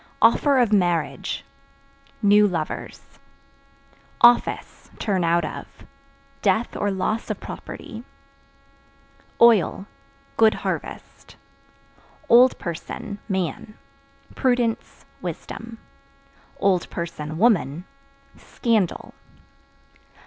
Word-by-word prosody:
Offer 285 -2 +4
of 240 -4 +3
Marriage 175 -5 0 0.8
New 205 +1 +6
lovers. 165 -5 -4 1.2
Office 240 0 +3
(Turn 195 -5 0
out 170 0 +2
of) - - -7 0.7
death 230 +2 +1
or 205 - -1
loss 200 +4 -2
of - - -3
property. 225 +1 -8 1.4
Oil 220 -4 +4 0.5
Good 220 -1 +5
harvest. - - -6 0.9
Old 245 +2 +6
Person 175 +4 -6
(Man) 190 +3 -3 0.6
prudence, 245 -3 -1 0.2
wisdom; 230 0 -7 0.8
(woman) 170 - 0 0.5
scandal. 220 -7 -1
205 Hz, 70 wpm, -23 LUFS, 175-230 Hz, 1.4 s, New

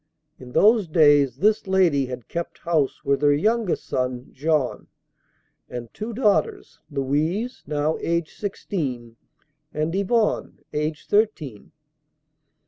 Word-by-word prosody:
In 125 -1 -11
those 215 -2 +5
days 145 -5 +4
this 210 +5 +2
lady 175 -8 +3
had 125 -2 -7
kept 170 0 -5
house 155 -4 -1
with 140 0 +1
her 145 -1 +5
youngest 215 +4 0
son, 125 -1 -2
Jean, 150 -2 -1 0.8
and 120 -2 -7
two 215 +2 -5
daughters, 210 - 0
Louise, 155 - -1
now 150 +1 0
aged 170 -1 -1
sixteen, 135 - -4 0.6
and 155 +2 -2
Yvonne, 210 +3 0 0.2
aged 150 0 -3
thirteen. 185 - 0
155 Hz, 115 wpm, -23 LUFS, 140-195 Hz, 0.8 s, those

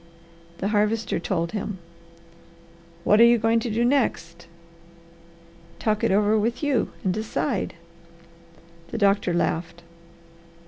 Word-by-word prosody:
The 195 - -2
Harvester 215 0 0
told 170 -1 -2
him. 210 -2 -4 1.3
"What 210 +4 +4
are - - +10
you 235 0 +6
going 225 +1 +2
to 235 - -4
do 230 +2 +1
next?" 175 -10 -1 1.3
"Talk 215 -1 -1
it - - +3
over 210 +2 +3
with 230 +6 -2
you 280 -5 +1
and 185 - +1
decide." 215 +2 -2 1.1
The 230 - -6
doctor 200 -3 +2
laughed. 170 0 -2
210 Hz, 120 wpm, -24 LUFS, 190-230 Hz, 1.3 s, are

